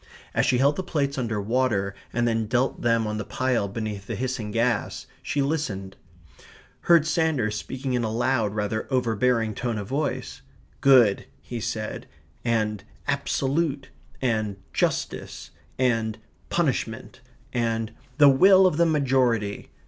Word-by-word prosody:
As - - +2
she 125 - +3
held 140 +3 +3
the 190 - -2
plates 140 -6 -1
under 110 -4 -1
water 105 -2 0 0.2
and 120 0 +1
then 115 -2 0
dealt 125 +3 0
them 115 -1 +2
on 105 0 -3
the - - -2
pile 125 -2 0
beneath 105 -1 -5
the 115 - -3
hissing 120 -1 -3
gas, 115 0 0 0.2
she 145 - -1
listened: 110 -11 -2 0.9
heard 170 -3 +7
Sanders 155 -9 +1
speaking 130 +5 -4
in 120 -1 +1
a 110 - -1
loud 115 -3 0
rather 110 +1 -2
overbearing 115 -2 +1
tone 120 +1 -2
of 100 -2 -5
voice: 140 +2 -3 0.4
"good," 125 -7 +5
he 115 - -6
said, 110 -1 -4 0.4
and 110 -3 0 0.2
"absolute" 140 +1 -1 0.3
and 110 -5 0 0.2
"justice" - - -2 0.3
and 115 -4 +1 0.3
"punishment," - - -2 0.3
and 115 -2 -1 0.3
"the 145 -2 +8
will 190 +8 +7
of 180 -5 +2
the 170 0 +4
majority." 130 -8 +1
120 Hz, 140 wpm, -25 LUFS, 110-135 Hz, 0.9 s, the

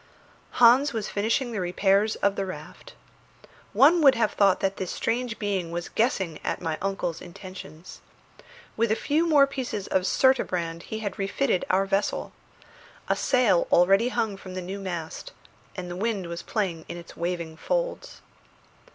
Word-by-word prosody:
Hans 250 +4 +5
was 220 -3 -3
finishing 230 +4 0
the 215 -4 -3
repairs 195 +4 +2
of 200 0 +3
the 195 - -1
raft. 185 - -9 0.8
One 325 +5 +5
would 275 -3 +7
have 230 -3 +1
thought 195 -2 +3
that 195 0 -1
this 185 - -4
strange 235 0 -2
being 195 -5 -2
was 170 0 -4
guessing 190 -9 0
at - - -2
my 160 -3 -3
uncle's 195 -4 -2
intentions. 175 -2 -11 0.7
With 230 0 +1
a - - +3
few 310 +7 +1
more 290 -3 +6
pieces 260 -7 -4
of 185 0 0
surturbrand 180 -12 +1
he 220 0 -4
had 205 0 -5
refitted 200 +1 0
our 190 +1 +3
vessel. 195 +1 -1 0.8
A - - +3
sail 240 -9 +2
already 195 +7 +4
hung 215 -5 -1
from 185 -1 -10
the 185 - -3
new 190 +3 -6
mast, 175 -4 -6 0.4
and 180 -1 -5
the - - -5
wind 205 -1 -2
was 170 0 -5
playing 185 -7 -2
in - - -5
its 170 0 -11
waving 170 -2 -3
folds. - - -3
195 Hz, 160 wpm, -26 LUFS, 180-230 Hz, 0.8 s, would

